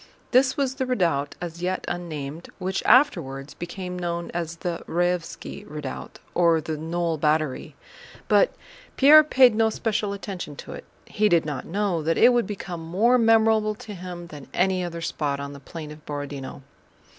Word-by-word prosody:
This 255 +1 +4
was 270 -2 0
the 265 -1 -3
redoubt, 165 - 0
as 170 -1 -6
yet 185 +1 -2
unnamed, 160 -2 -5
which 190 0 -2
afterwards 140 - +3
became 180 +1 -6
known 170 -1 -3
as 170 -1 -3
the 170 0 -4
Raévski 175 0 -2
Redoubt, 150 -3 -7 0.2
or 170 -2 +4
the 155 0 -4
Knoll 165 +1 -2
Battery, 155 -2 0 0.5
but - - +4 0.5
Pierre 300 +3 +9
paid 260 -5 +5
no 220 +1 +3
special 215 -2 -1
attention 195 -6 -6
to - - -9
it. - - -9 0.2
He 210 0 +1
did 170 -4 +3
not 145 -4 -4
know 195 -2 0
that 165 +2 0
it 245 +2 +6
would 240 -1 +2
become 180 -5 -6
more 215 +10 +3
memorable 220 -1 +4
to 210 0 -9
him 180 -2 -7
than 150 -5 -11
any 185 0 +2
other 170 -1 -5
spot 145 -3 -2
on 140 0 -6
the 140 - -10
plain 150 +2 -8
of 150 0 -12
Borodinó. 145 -2 -6
175 Hz, 170 wpm, -25 LUFS, 155-210 Hz, 0.5 s, Pierre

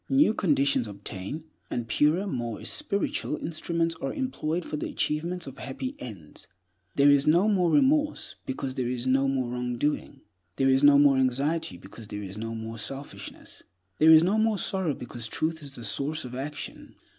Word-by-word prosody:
New 270 -4 +4
conditions 140 - +2
obtain, 100 - -6 0.3
and 120 -2 -3
purer, 150 - +2
more 120 - -3
espiritual 200 - -1
instruments 165 +1 -1
are - - -2
employed 180 - -2
for - - -4
the 150 - -3
achievements 170 +3 -1
of 135 -1 -10
happy 130 0 -5
ends. 95 -11 -10 0.5
There 140 +1 +6
is 145 +1 +4
no 175 +7 +5
more 185 -5 +3
remorse, 295 - +2
because 130 0 -3
there 130 -2 -2
is 125 0 -2
no 135 +1 +3
more 130 -3 -1
wrong 125 0 -3
doing. 150 +4 -2 0.3
There 135 0 +2
is 130 0 +4
no 145 -1 +7
more 140 -1 +5
anxiety, 130 - 0
because 100 +4 -12
there 105 0 -6
is 95 0 -7
no 115 +1 -5
more 115 0 -6
selfishness. 135 +6 -7 0.4
There 155 - +6
is 160 0 +9
no 200 +5 +2
more 220 -1 +2
sorrow, 185 -7 0
because 120 -1 -6
Truth 160 +6 -1
is 140 -2 -7
the 120 - -7
source 140 +8 -1
of 125 - -8
action. 145 +3 -6
140 Hz, 180 wpm, -27 LUFS, 125-165 Hz, 0.5 s, is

